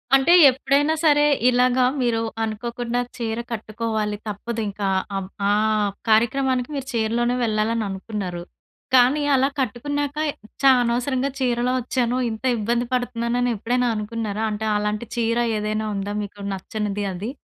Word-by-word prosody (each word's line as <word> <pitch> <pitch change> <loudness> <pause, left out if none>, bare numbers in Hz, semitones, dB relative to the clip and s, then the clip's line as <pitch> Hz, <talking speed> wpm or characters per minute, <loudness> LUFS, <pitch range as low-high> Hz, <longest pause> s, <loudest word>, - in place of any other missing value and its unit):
అంటే 270 +6 +4 0.2
ఎప్పుడైనా 280 +4 +1
సరే, 295 -2 +5 0.3
ఇలాగా 250 0 +3 0.2
మీరు 235 -2 +1 0.2
అనుకోకుండా 235 +2 -3 0.2
చీర 230 -1 -2
కట్టుకోవాలి, 215 -1 -2
తప్పదు 225 +3 -4
ఇంకా 200 0 -3 0.3
ఆవ్ 190 -1 -5 0.2
ఆహ్, 215 0 +2 0.2
కార్యక్రమానికి 250 +3 +2
మీరు 270 -1 -4
చీరలోనే 235 +2 +1
వెళ్ళాలననుకున్నారు. 210 -4 -2 0.5
కానీ 255 +4 +5
అలా 265 +1 +3
కట్టుకున్నాక 285 +4 -2 0.4
ఛా! 275 -1 +7
అనవసరంగా 250 +3 0
చీరలో 245 -1 +1
ఒచ్చాను. 245 0 0
ఇంత 220 +2 -7
ఇబ్బంది 235 +3 0
పడుతున్నానని 245 0 0
ఎప్పుడైనా 245 +4 0
అనుకున్నారా? 215 0 -3
అంటే 215 +1 -3
అలాంటి 210 +2 -2
చీర 230 0 +1 0.2
ఏదైనా 215 +1 -2
ఉందా, 200 +1 -3
మీకు 205 0 -9
నచ్చనిది 205 +1 -3
అది? 200 +7 -5
230 Hz, 125 wpm, -22 LUFS, 215-250 Hz, 0.5 s, ఛా